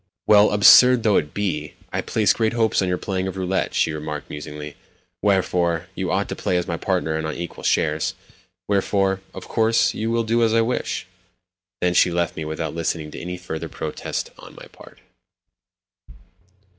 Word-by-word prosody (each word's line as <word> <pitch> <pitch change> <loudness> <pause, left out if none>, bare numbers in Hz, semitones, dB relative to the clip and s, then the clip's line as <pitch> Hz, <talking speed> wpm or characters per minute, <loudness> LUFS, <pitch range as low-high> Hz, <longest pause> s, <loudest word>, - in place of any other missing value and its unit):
"Well, 105 0 +6
absurd 120 +4 +7
though 105 -3 +4
it 75 - -1
be, 80 -7 -3 0.2
I - - 0
place 110 -2 +2
great 110 -1 0
hopes 115 -3 +2
on 95 - 0
your 90 0 0
playing 95 -1 -3
of 95 0 -5
roulette," 95 0 -1
she - - +2
remarked 75 -1 -6
musingly; 75 0 -7 0.5
"wherefore, 90 -4 +1
you 95 -1 -3
ought 95 +2 0
to - - -3
play 90 - -1
as 90 - -1
my - - -2
partner 80 +2 -1
and 80 0 -2
on 80 - -4
equal 85 0 -7
shares; 80 +1 +1 0.5
wherefore, 95 -1 +1
of 95 - -8
course, 115 0 +2
you 110 +1 -3
will 115 0 +1
do 115 +1 +1
as 115 -1 +3
I 115 - +5
wish." 120 +2 -2 0.8
Then 90 0 +2
she 90 - +5
left 85 -1 -1
me 80 - -4
without 80 +1 -4
listening 80 -2 -3
to - - -8
any 90 +1 -5
further 85 -3 -6
protests - - -5
on - - -13
my - - -11
part. - - -16
90 Hz, 180 wpm, -22 LUFS, 80-105 Hz, 0.8 s, absurd